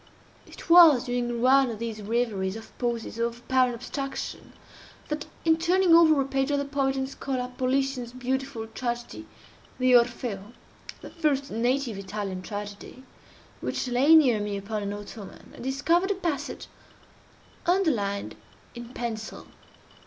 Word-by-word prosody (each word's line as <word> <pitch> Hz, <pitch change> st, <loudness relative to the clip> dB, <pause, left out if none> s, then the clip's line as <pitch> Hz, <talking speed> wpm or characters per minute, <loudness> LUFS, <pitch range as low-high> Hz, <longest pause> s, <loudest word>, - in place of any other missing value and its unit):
It -, -, -12 dB
was 335 Hz, -7 st, +8 dB
during 240 Hz, -1 st, -2 dB
one 265 Hz, 0 st, +5 dB
of 225 Hz, -, -5 dB
these 225 Hz, -1 st, -5 dB
reveries 210 Hz, -3 st, -1 dB
or 225 Hz, -, -9 dB, 0.2 s
pauses 235 Hz, -2 st, -3 dB
of 235 Hz, 0 st, -1 dB
apparent 255 Hz, 0 st, +1 dB
abstraction, 270 Hz, +3 st, -6 dB, 0.6 s
that, 300 Hz, -1 st, -3 dB, 0.2 s
in 320 Hz, -1 st, +4 dB
turning 350 Hz, +1 st, +3 dB
over 320 Hz, -3 st, +7 dB
a 270 Hz, -, +1 dB
page 270 Hz, 0 st, -1 dB
of 290 Hz, -, +1 dB
the 280 Hz, -, -1 dB
poet 275 Hz, -1 st, 0 dB
and 265 Hz, 0 st, -1 dB
scholar 255 Hz, -2 st, -4 dB
Politian's 260 Hz, -1 st, -1 dB
beautiful 255 Hz, -1 st, -3 dB
tragedy 240 Hz, +6 st, -5 dB, 0.5 s
"The 255 Hz, 0 st, +3 dB
Orfeo," 235 Hz, -3 st, 0 dB, 0.5 s
(the -, -, -10 dB
first 285 Hz, -4 st, 0 dB
native 240 Hz, -1 st, 0 dB
Italian 195 Hz, -1 st, -5 dB
tragedy,) 205 Hz, +5 st, -8 dB, 0.6 s
which -, -, -3 dB
lay 260 Hz, +6 st, +5 dB
near 255 Hz, -9 st, +5 dB
me 205 Hz, -1 st, -3 dB
upon 210 Hz, +2 st, -4 dB
an 200 Hz, 0 st, -3 dB
ottoman, 205 Hz, 0 st, -10 dB
I -, -, -13 dB
discovered 310 Hz, +9 st, +1 dB
a 405 Hz, -, +1 dB
passage 300 Hz, -6 st, -3 dB, 1.0 s
underlined 250 Hz, -, +1 dB, 0.4 s
in 240 Hz, +1 st, -10 dB
pencil. 220 Hz, -2 st, -5 dB
250 Hz, 140 wpm, -26 LUFS, 225-275 Hz, 1.0 s, was